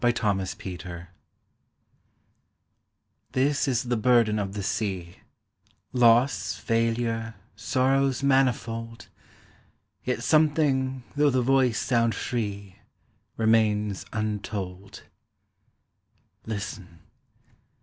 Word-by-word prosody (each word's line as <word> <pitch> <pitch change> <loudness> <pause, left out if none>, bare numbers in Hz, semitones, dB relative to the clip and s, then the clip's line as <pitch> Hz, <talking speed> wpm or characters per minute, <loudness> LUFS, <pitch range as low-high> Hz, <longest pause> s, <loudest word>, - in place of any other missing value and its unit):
SEA 120 0 +4
SIGHING 95 -3 -3 2.3
This 140 +2 +1
is 125 -2 +1
the 120 -1 -1
burden 115 -2 +3
of 100 -1 -3
the 100 -1 -4
Sea, 95 -5 -3 0.8
Loss, 120 +2 +3
failure, 115 0 -1 0.2
sorrows 135 +3 +1
manifold; 120 -4 0 0.9
Yet - - -2
something 145 -4 +2
though 145 0 +4
the 130 -2 +1
voice 130 -3 +3
sound 115 -2 +1
free 100 -5 -4 0.6
Remains 105 -3 +1
untold. 100 -3 -4 1.4
Listen! 100 -5 -6
115 Hz, 75 wpm, -26 LUFS, 105-130 Hz, 2.3 s, SEA